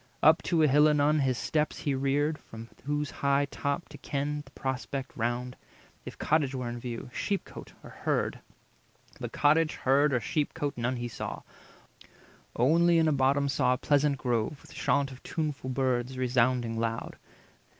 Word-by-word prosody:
Up 160 +2 +6
to 165 -3 +2
a - - +6
hill 150 +2 +5
anon 150 +1 +3
his 130 -3 +1
steps 155 +2 -1
he 145 - 0
reared, 145 +3 0
From 115 +1 -11 0.2
whose 145 0 -1
high 140 0 +3
top 140 +4 -2
to - - -11
ken 145 +1 -2
the 135 - -17
prospect 135 0 -4
round, 120 +2 -2 0.5
If - - -8
cottage 145 -3 +1
were 125 -2 -3
in 120 0 -5
view, 120 0 -6
sheep 200 -2 -1
cote, - - -11
or - - -11
herd; - - -1 0.8
But - - -5
cottage, 155 +2 +3
herd, 140 +3 +3
or 125 - +2
sheep 145 +6 -1
cote, 145 -1 -2
none 125 +2 -1
he 120 0 -3
saw— 120 - -6 1.1
Only 165 +7 +4
in 160 -1 +4
a 155 - +3
bottom 140 +1 +2
saw 135 -2 +2
a - - -1
pleasant 145 0 +2
grove, 125 +3 -1
With - - -15
chaunt 140 -1 +1
of 130 - -11
tuneful 150 -5 -3
birds 130 -1 0
resounding 125 -2 +1
loud. 115 0 -3
140 Hz, 170 wpm, -29 LUFS, 125-150 Hz, 1.1 s, Up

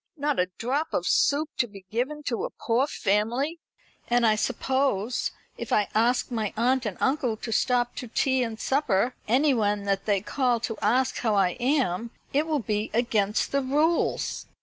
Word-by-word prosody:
Not 290 -1 0
a 180 0 +1
drop 275 +7 -1
of - - -1
soup 300 +2 +2
to 240 - +2
be 195 -3 -13
given 270 +7 -2
to 235 -5 -2
a - - -2
poor 240 +5 0
family; 240 - 0 0.5
and 240 0 +3
I 215 -1 +4
suppose, 250 -1 0 0.3
if - - -6
I 210 - +2
ask 245 +4 +2
my 220 -4 -1
aunt 250 +1 +2
and 195 - -5
uncle 260 -5 0
to 225 - -6
stop 245 +1 +1
to 250 - -5
tea 260 +3 +1
and 225 -2 -3
supper, 255 -4 +1
anywhen 225 -5 +2
that 195 -1 -1
they 205 -2 +2
call 245 +3 0
to 225 -1 -3
ask 250 +5 +1
how 220 -4 +1
I 195 -2 +4
am, 240 -6 0 0.2
it 295 +3 +2
will 310 -2 +1
be 210 0 -1
against 220 -3 +1
the 275 - +1
rules." 300 +6 0
240 Hz, 175 wpm, -26 LUFS, 215-270 Hz, 0.5 s, I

